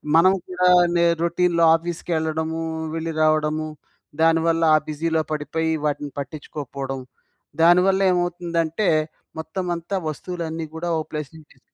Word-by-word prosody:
మనం 185 +3 +6
కూడా 180 0 +1 0.3
నే 170 0 +4 0.2
రొటీన్‌లో 170 0 +2
ఆఫీస్‌కెళ్ళడము, 160 -1 -2 0.3
వెళ్లి 165 0 -3
రావడము. 155 0 +1 0.5
దానివల్ల 165 0 +3
ఆ - - +6
బిజీలో 160 +1 0
పడిపోయి 155 +2 -1
వాటిని 145 -1 -2
పట్టించుకోకపోవడం. 140 -2 -6 0.6
దానివల్లేమవుతుందంటే 175 -1 +2 0.5
మొత్తం 180 +4 -4
అంతా 170 +4 -5
వస్తువులన్నీ 165 +1 -5
గూడా 170 +2 -3
ఒక 155 - -4
ప్లేస్ 150 -2 -4
నుంచి 155 -2 -16
తీసి 130 - -28
165 Hz, 110 wpm, -22 LUFS, 155-175 Hz, 0.6 s, మనం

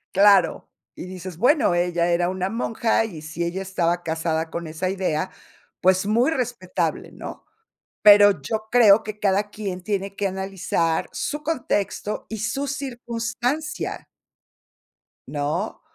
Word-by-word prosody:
Claro, 195 -3 +4 0.2
y - - -8
dices: 185 -2 -8
"Bueno, 275 - +3
ella 175 -1 +1
era 175 +1 +2
una 185 0 -2
monja 225 -1 +1
y 165 -8 -7
si 160 +2 -4
ella 180 +3 -3
estaba 175 -2 0
casada 160 0 -1
con 170 -1 -4
esa 160 +4 -3
idea, 185 -2 -1 0.5
pues 185 +1 +3
muy 235 +7 +3
respetable, 215 - -2
¿no?" - - -9 0.6
Pero 205 -3 +8
yo 215 +9 -3
creo 220 -4 +7
que 215 -1 -7
cada 205 0 +1
quien 195 -4 -5
tiene 200 0 -3
que 200 - 0
analizar 190 -4 -1
su 295 0 -3
contexto 225 -9 -2
y 220 - -4
su 275 +7 -2
circunstancia. 250 +2 -3 1.2
¿No? 145 0 -3
195 Hz, 130 wpm, -23 LUFS, 175-225 Hz, 1.2 s, Pero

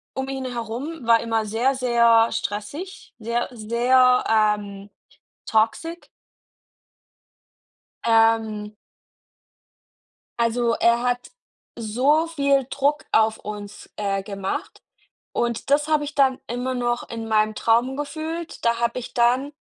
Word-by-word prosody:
um 265 0 -3
ihn 265 -1 -4
herum 245 +4 -5
war 230 -1 +5
immer 225 -1 -1
sehr, 235 +6 0
sehr 235 -2 +4
stressig, 230 - -5
sehr, 235 +2 -2
äh, 245 - -13
sehr, 250 +3 +3
ähm, 210 -2 0 0.6
toxic. 230 +10 0 2.0
Ähm. 225 -2 +2 1.6
Also, 235 0 +1
er 235 0 +3
hat 245 - -2 0.5
so 260 +9 +2
viel 280 -5 +1
Druck 285 +2 0
auf 220 0 +3
uns, 205 -1 -9
äh, 195 -1 -1
gemacht. 195 -1 -5 0.5
Und 235 +3 -2
das 295 +1 +3
habe 305 -1 +2
ich 295 0 -7
dann 265 -2 +3
immer 250 +2 -3
noch 240 -1 -2
in 225 -1 -5
meinem 215 0 +2
Traum 235 +5 +1
gefühlt. 315 +2 -5
Da 235 0 +2
habe 235 +1 -1
ich 245 - -8
dann 250 +4 +2
235 Hz, 120 wpm, -23 LUFS, 220-265 Hz, 2.0 s, war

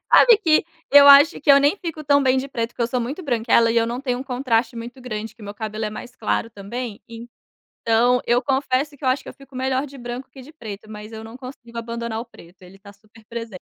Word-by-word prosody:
Sabe 475 -3 +8
que 325 -7 +3 0.3
eu 285 0 +8
acho 285 +4 +7
que - - +3
eu 280 - +8
nem 290 +8 +3
fico 330 -5 -6
tão 285 0 +4
bem 260 -1 +3
de 270 +2 -4
preto, 230 -3 -3
porque 240 - -4
eu - - +2
sou 245 +1 -2
muito 275 +10 -5
branquela 235 -4 +2
e 235 - -1
eu 230 - +3
não 240 +2 -4
tenho 250 -3 -2
um - - -4
contraste 245 -2 -1
muito 240 +3 -8
grande, 220 -3 -6
que 230 - -17
meu 205 0 -8
cabelo 215 0 -5
é 210 - -2
mais 245 +3 -9
claro 105 - -1
também, 215 +2 -7 0.6
então, 240 +2 +1
eu 240 +1 +2
confesso 275 +1 0
que 285 - -19
eu 260 - +2
acho 265 +1 0
que - - -9
eu - - -10
fico 275 -1 -17
melhor 265 +2 -1
de 275 - -13
branco 245 +1 -7
que 265 +1 -13
de 300 +5 -14
preto, 215 -6 -9
mas 210 0 -9
eu 220 0 -8
não 225 +2 -11
consigo 255 -2 -11
abandonar 230 -1 -4
o 235 - -6
preto. 180 -6 -18
Ele 185 +1 -15
tá 200 +1 -15
super 215 +2 -22
presen 230 -3 -7
240 Hz, 255 wpm, -22 LUFS, 225-270 Hz, 0.6 s, Sabe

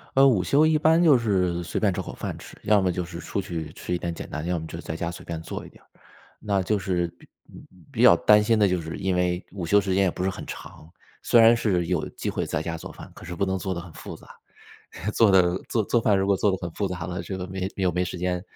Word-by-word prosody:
呃， 135 +1 +7
午 105 -9 +3
休 145 - +4
一 155 -1 +3
般 160 +2 +4
就 150 -6 +6
是 90 -6 0
随 - - -3
便 105 -3 +2
找 - - -3
口 - - -8
饭 - - -5
吃， - - -13
要 105 -1 +4
么 90 -1 +1
就 90 +1 -2
是 85 0 -8
出 95 +3 -3
去 80 -4 -5
吃 90 - -5
一 - - +1
点 85 -1 -4
简 - - -8
单， 75 +2 -5
要 90 0 0
么 80 - -5
就 85 - -7
在 80 - -6
家 85 +1 -3
随 - - -10
便 85 -1 -5
做 80 - -7
一 - - -11
点 - - -21
儿。 - - -31 0.5
那 100 -2 0
就 105 +3 0
是 90 -3 -1
比 - - -19 0.6
比 - - -2
较 - - +9
担 105 0 +5
心 115 +1 +2
的， 100 - +5
就 90 -1 0
是 80 0 -6
因 95 -1 -1
为 90 0 0
午 95 -4 -5
休 100 +5 +4
时 95 -1 -1
间 100 +1 +3
也 90 - +2
不 90 - -4
是 95 - +1
很 - - -7
长， 80 - -10 0.3
虽 120 - +4
然 115 +1 +7
是 90 -7 0
有 90 - -1
机 - - -5
会 - - -2
在 - - -2
家 85 0 -4
做 - - -9
饭， - - -12
可 - - -12
是 90 - -6
不 100 - 0
能 95 0 -1
做 95 0 -3
得 85 - -5
很 85 -2 -12
复 - - -9
杂， - - -16 0.9
做 110 -3 +5
得 90 -1 +4
做 110 - +1
做 120 - +2
饭 105 -3 +3
如 95 - +1
果 100 -1 +3
做 105 - +2
得 95 - 0
很 85 -2 -5
复 100 - -2
杂 90 -3 -5
了， 90 +1 -4
这 95 - -5
个 90 0 -5
没 95 0 -3
又 95 -2 +1
没 90 +1 0
时 90 - -5
间， 90 0 -1
95 Hz, 310 characters per minute, -25 LUFS, 85-100 Hz, 0.9 s, 较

